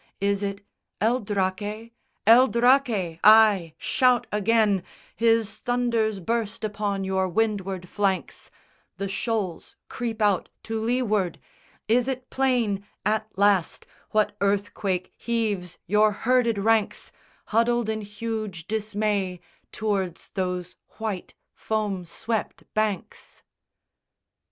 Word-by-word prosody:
Is 200 +1 +1
it 200 0 -4 0.3
El 235 +4 +2
Draque? 205 +2 -2 0.3
El 240 +4 +8
Draque! 235 -9 +2
Ay, 210 -6 +6
shout 250 -2 +2
again, 210 -1 +2 0.3
His 225 -2 +2
thunders 235 -4 0
burst 225 +3 -2
upon 205 -2 -2
your 190 0 0
windward 195 -3 -1
flanks; 195 0 -2 0.5
The 195 - -2
shoals 195 -3 -3
creep 230 -2 -4
out 205 -4 +2
to 225 0 -3
leeward! 215 -6 0 0.5
Is 240 +3 +3
it 260 -1 -4
plain 240 -7 +1 0.2
At 215 +1 +1
last, 200 -3 +2 0.2
what 215 -1 +1
earthquake 200 -2 -1
heaves 210 -7 -2
your 210 +3 +4
herded 235 +1 +2
ranks 215 +1 +1 0.3
Huddled 235 +1 +2
in 220 0 -2
huge 205 -4 -5
dismay 210 -3 -1 0.3
tow'rds 195 -5 -2
those 180 -2 -3 0.2
white 215 -5 -4 0.2
foam 205 -4 -2
swept 220 +6 -3
banks? 215 -4 -3
210 Hz, 105 wpm, -25 LUFS, 195-225 Hz, 0.5 s, El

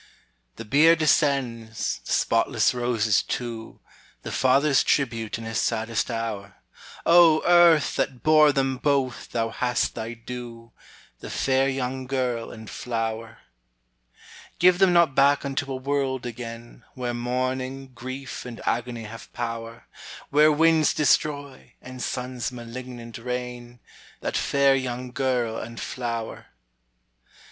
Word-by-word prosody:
The 115 - -8
bier 150 +9 +5
descends, 135 -8 0
the - - -7
spotless - - +2
roses 115 -4 +1
too, 115 -2 -6 0.4
The - - -6
father's 135 +2 +3
tribute 115 -6 0
in 115 - -8
his 115 0 -2
saddest 115 +1 -1
hour: 110 -4 -4 0.5
O 165 -2 +6
Earth! 175 -3 +5
that 130 -2 -2
bore 155 -1 +6
them 135 -2 0
both, 135 -3 -1
thou 115 -1 -1
hast 125 +1 -1
thy 115 +1 -5
due, 115 -1 -9 0.5
The - - -8
fair 135 0 +1
young 130 -1 -3
girl 125 -3 -2
and 110 -1 -10
flower. 115 -1 -4 1.2
Give 180 0 +5
them 190 -2 +5
not 170 -5 +4
back 140 +1 +3
unto 140 0 -3
a - - -2
world 130 -1 -2
again, 115 0 -8
Where 125 -2 -3
mourning, 130 +2 -3
grief, 130 +2 -7
and 120 -2 -8
agony 120 0 -2
have 110 +1 -10
power, 115 -1 -5 0.5
Where 150 +2 +6
winds 160 0 +3
destroy, 145 -2 0
and 130 0 -10
suns 125 -1 -3
malignant 120 -1 -8
reign, 125 0 -6 0.4
That - - -3
fair 140 -1 +3
young 125 -1 -4
girl 125 -3 -1
and 115 0 -8
flower. 115 -3 -5
125 Hz, 125 wpm, -25 LUFS, 115-140 Hz, 1.2 s, O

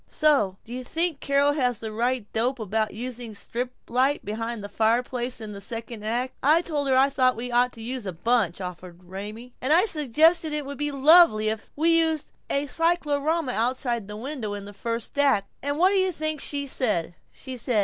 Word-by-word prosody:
"Say, 295 - +3
do 235 - -10
you 255 +1 -5
think 325 +2 -1
Carol 280 +1 +2
has 250 -5 0
the 220 +1 -6
right 240 +1 -1
dope 245 +4 0
about 220 0 -1
using 240 0 -6
a - - -12
strip 245 +4 -4 0.2
light 265 +4 +1
behind 225 +1 -4
the - - -5
fireplace 240 +4 0
in 215 -2 -6
the 200 -1 -8
second 230 +1 -6
act? 240 +4 -1
I 310 +5 +4
told 295 -5 -2
her 260 -1 +3
I 270 +1 +6
thought 255 -2 +2
we 245 +2 -5
ought 245 +1 +3
to 225 - -9
use 245 -2 -4
a - - -2
bunch," 200 0 0
offered 180 -1 -8
Raymie. 210 +7 -8
"And 260 - -1
I 350 +6 +7
suggested 315 - +3
it 300 -1 -1
would 280 0 -7
be 295 0 -1
lovely 275 -6 +6
if 220 -1 -5
we 330 +2 +3
used 320 -2 0 0.2
a 280 +1 0
cyclorama 315 -1 0
outside 240 -1 -1
the 210 0 -7
window 235 -4 -4
in 200 -1 -7
the 205 - -10
first 230 +5 -4
act, 270 -9 +3 0.2
and 285 +1 -2
what 365 +4 +4
do 395 - +3
you 375 0 +2
think 310 -3 -3
she 285 -1 -1
said? 210 -11 -1
250 Hz, 200 wpm, -25 LUFS, 220-290 Hz, 0.2 s, I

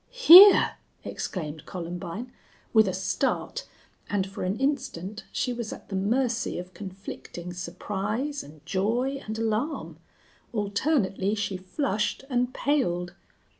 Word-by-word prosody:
"Here!" 395 +3 +10 0.3
exclaimed 155 -4 -5
Columbine, 180 +6 -6 0.4
with 220 -2 +6
a - - +1
start, 190 +1 -2 0.4
and 200 -2 0
for 195 0 -7
an 185 +3 -1
instant 215 - -2
she 250 - -1
was 235 -2 -5
at - - -10
the 195 - -3
mercy 235 +4 0
of 180 +1 -7
conflicting 185 -3 -8
surprise 210 +9 -3
and 150 0 -15
joy 245 +8 0
and 215 +1 -4
alarm. 225 +7 -2 0.5
Alternately 205 -2 0
she 205 -2 -2
flushed 210 +5 -2
and 245 0 +1
paled. 180 -13 0
205 Hz, 120 wpm, -27 LUFS, 185-245 Hz, 0.5 s, Here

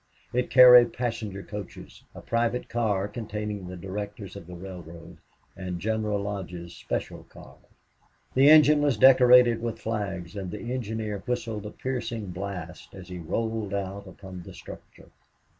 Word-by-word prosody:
It 125 +1 0
carried 125 -2 +8
passenger 115 -5 -4
coaches, 105 -2 -9
a - - -9
private 115 +1 -1
car 105 -4 0
containing 105 -3 -5
the 90 0 -7
directors 100 +2 -6
of 95 -4 -10
the 90 - -9
railroad, 85 -2 -10 0.4
and 90 -2 -5
General 110 0 -1
Lodge's 90 -4 -6
special - - -4
car. - - -15 0.8
The 135 +2 +6
engine 150 -1 +7
was 145 -6 +2
decorated 125 -2 +7
with 115 -1 -3
flags 100 -5 -4
and 95 -2 -5
the 115 +5 -5
engineer 110 -4 -3
whistled 115 -4 -3
a - - -6
piercing 115 -5 -4
blast 90 -2 -7
as 95 -1 -11
he 90 -1 -6
rolled 110 +4 -2
out 100 0 -5
upon 95 -1 -10
the - - -12
structure. - - -13
105 Hz, 145 wpm, -26 LUFS, 95-115 Hz, 0.8 s, carried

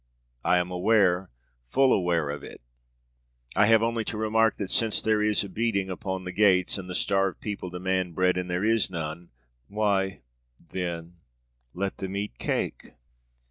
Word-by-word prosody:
I 90 - +4
am 90 +1 -1
aware, 95 -1 +2 0.4
full 130 - +4
aware 85 -5 +1
of 75 -1 -6
it. - - -10 0.9
I 105 +1 +5
have 115 0 +5
only 115 0 0
to 105 - -4
remark 110 0 +2
that, 100 - -4
since 115 -2 +3
there 110 -1 +2
is 105 -1 +2
a - - -6
beating 100 -2 -1
upon 95 0 -4
the 90 - -5
gates 95 -2 +3
and 90 -1 -8
the 90 - -4
starved 95 -1 +1
people 100 -3 -5
demand 90 -1 -2
bread 90 0 +3
and 90 0 -3
there 90 +3 0
is 115 -2 +2
none, 85 -1 -5 0.4
'Why 100 -2 0 0.4
then, 85 -1 -5 0.6
let 95 +2 -2
them 95 0 -5
eat 100 -11 -4
cake!' - - -3
95 Hz, 165 wpm, -27 LUFS, 90-105 Hz, 0.9 s, I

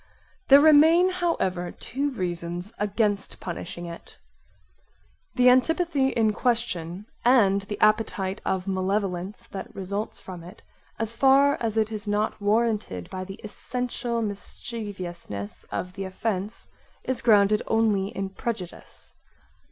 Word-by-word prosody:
There 275 +1 +9
remain 320 +4 +6
however 190 - -1
two 280 +3 -3
reasons 175 -3 -4
against 205 0 -1
punishing 175 0 -6
it. 170 0 -10 1.2
The 250 0 +4
antipathy 280 +3 +3
in 225 -5 +2
question 205 -7 -1 0.2
(and 210 -6 +4
the 205 +1 -6
appetite 215 -2 +1
of 190 0 -1
malevolence 190 0 -2
that 195 - -8
results 200 +2 -4
from 180 -3 -9
it) 175 - -13 0.3
as 225 0 -2
far 275 +3 +5
as 225 -1 -1
it 220 0 +1
is 210 -1 -5
not 210 +1 -1
warranted 210 - 0
by 185 0 -4
the 195 +1 -9
essential 240 +2 -3
mischieviousness 195 - -6
of 180 0 -4
the 195 0 -5
offence 195 +2 -3 0.4
is 260 - -2
grounded 210 -2 +4
only 215 -4 +2
in 195 -1 -4
prejudice. 195 -4 -6
210 Hz, 120 wpm, -26 LUFS, 190-235 Hz, 1.2 s, There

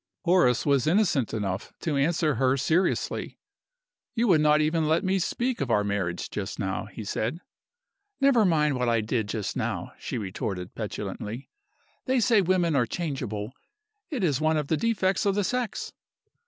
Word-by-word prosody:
Horace 175 - +3
was 140 -2 +2
innocent 165 - +2
enough 100 -3 -3
to 155 -3 -1
answer 155 +2 +2
her 130 +2 +2
seriously. 165 +7 0 0.8
"You 235 0 +2
would 160 -4 +5
not 150 0 +4
even 155 +1 +1
let 160 +5 +2
me 190 0 +1
speak 240 - -1
of 135 - -1
our 105 -3 +3
marriage 100 -4 -2
just 95 -2 -4
now," 95 -1 -2
he 110 - -8
said. 110 +7 -2 0.8
"Never 275 -5 +5
mind 150 -7 +2
what 125 -1 +1
I 115 -1 +2
did 110 -1 -1
just 105 -2 -3
now," - - -3
she - - -4
retorted, 95 -3 -4
petulantly. 105 +3 -5 0.5
"They 260 -1 +2
say 230 -2 +4
women 175 -3 +2
are 125 -4 +2
changeable. 125 -9 -4 0.6
It 270 - -2
is 150 -5 +1
one 155 0 +2
of 150 -2 -2
the 160 - +3
defects 195 -1 +1
of 195 - +2
the 205 - +1
sex." 250 +2 -2
150 Hz, 170 wpm, -27 LUFS, 110-185 Hz, 0.8 s, would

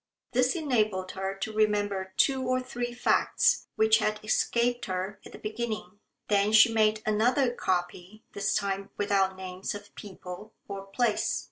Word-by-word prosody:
This 255 +3 +2
enabled 215 - 0
her 190 0 -4
to 205 +3 -5
remember 205 -3 0
two 270 -1 +3
or 255 0 +1
three 245 -1 -4
facts 240 +1 +2
which 220 0 +4
had 215 -1 0
escaped 240 +3 +1
her 190 +1 -4
at - - -12
the - - -10
beginning. 215 -3 -5 0.3
Then 205 +1 +2
she 220 +1 +7
made 215 -1 +2
another 240 +5 +2
copy 180 +1 -3
this 200 0 0
time 195 -1 -2
without 195 -2 +1
names 185 +1 -5
of 205 0 -11
people 195 +1 -9
or 195 0 -6
place. 220 +2 0
210 Hz, 150 wpm, -28 LUFS, 195-235 Hz, 0.3 s, she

